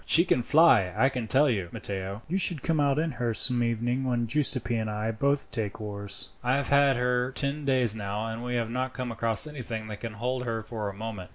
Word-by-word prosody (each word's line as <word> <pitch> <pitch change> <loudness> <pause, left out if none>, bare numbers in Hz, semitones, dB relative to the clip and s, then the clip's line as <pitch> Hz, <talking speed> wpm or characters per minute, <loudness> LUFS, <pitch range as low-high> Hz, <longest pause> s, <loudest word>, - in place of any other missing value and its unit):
"She 170 +2 +4
can 125 - +2
fly 155 -2 +5
along, 90 -2 -6
I 130 - +4
can 125 -4 -4
tell 140 +6 +4
you, 100 -9 -1
Matteo. 100 +2 -5
You 170 - -2
shall 180 -3 +3
come 155 +3 -1
out 140 -1 +2
in 160 +1 0
her 120 -3 -2
some 120 +3 +1
evening 120 +2 0
when 120 -2 0
Giuseppi 130 -2 0
and 110 -1 -2
I 105 +1 -2
both 140 +5 0
take 110 -4 -3
oars. 100 -1 -4
I 125 +1 +2
have 140 0 -1
had 140 -1 +4
her 125 +1 0
ten 140 +2 0
days 130 -5 +4
now, 105 0 -4
and 115 +1 -5
we 125 0 -3
have 115 -1 -1
not 130 +1 -3
come 125 -2 -4
across 115 +1 +2
anything 125 -7 -6
that 105 -1 -7
can 115 -2 -6
hold 125 +3 -2
her 115 -2 -3
for 110 -2 -4
a - - -7
moment." 105 -3 -6
120 Hz, 240 wpm, -27 LUFS, 110-135 Hz, -, fly